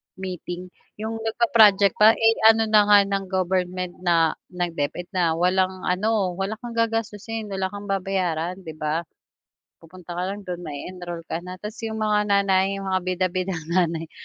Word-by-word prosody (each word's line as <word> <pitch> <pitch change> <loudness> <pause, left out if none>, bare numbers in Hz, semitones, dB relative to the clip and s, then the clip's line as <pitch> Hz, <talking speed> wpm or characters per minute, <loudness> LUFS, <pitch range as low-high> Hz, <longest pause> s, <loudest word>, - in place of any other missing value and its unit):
meeting, 180 -1 -6 0.2
'yong, 220 +1 -5
nag-pa-project 220 - +4
pa 220 +1 +7
eh, 225 0 +4
ano 225 0 +6
na 210 -1 +6
nga 205 0 +8
ng 195 0 -2
government 185 -1 -2
na 170 -3 +3 0.2
ng 175 -1 -3
Deped 175 +6 -3
na 170 -4 +1
walang 185 +2 +1
ano, 195 +1 +1
wala 195 +3 -2
kang 240 +1 -9
gagastusin, 225 -1 -2
wala 190 -1 -1
kang 200 +1 -8
babayaran, 185 -2 -2
'di 160 - -7
ba? 155 +2 -1 0.8
Pupunta 175 +1 -14
ka - - -1
lang 200 +2 -5
do'n 180 -1 -4
ma-e-enroll 175 +3 -7
ka - - -1
na. 180 +1 -8
Tas 210 +4 -8
'yong 220 0 -4
mga 210 -1 +2
nanay, 195 -1 +2
'yong - - -6
mga 185 -1 +1
bida-bidang 185 -1 -1
nanay, 165 -2 0
190 Hz, 165 wpm, -24 LUFS, 180-210 Hz, 0.8 s, nga